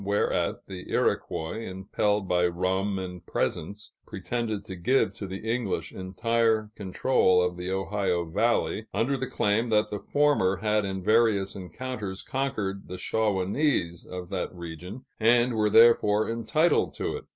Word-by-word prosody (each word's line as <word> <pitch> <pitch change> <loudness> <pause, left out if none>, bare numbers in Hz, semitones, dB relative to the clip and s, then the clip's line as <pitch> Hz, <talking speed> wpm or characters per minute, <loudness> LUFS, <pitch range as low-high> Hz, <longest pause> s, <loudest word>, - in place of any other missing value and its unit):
whereat 100 +1 0
the 95 -2 -9
Iroquois, 80 +7 -1
impelled 100 0 -1
by 90 -1 +3
rum 95 +3 -1
and 90 -2 -6
presents, 100 +6 -3 0.2
pretended 110 -4 -3
to 95 - -7
give 125 +10 +2
to 100 - -7
the 95 +4 -7
English 110 -8 -1
entire 110 +3 0
control 95 -1 +2
of 90 0 +1
the 90 +1 -5
Ohio 95 -2 -1
Valley, 110 +4 0
under 135 +5 +1
the 130 0 -3
claim 110 +3 +1
that 105 -1 +2
the 105 - -3
former 145 -11 +2
had 105 +1 +1
in 95 -1 -4
various 105 -3 +3
encounters 100 +1 -6
conquered 110 -8 -3
the 90 - -6
Shawanese 100 - 0
of 90 -1 -7
that 95 -2 -3
region 90 +8 -8
and 120 +2 +4
were 105 -1 +2
therefore 110 -1 +5
entitled 155 +9 +1
to - - -2
it. - - -8
100 Hz, 145 wpm, -27 LUFS, 95-115 Hz, 0.2 s, therefore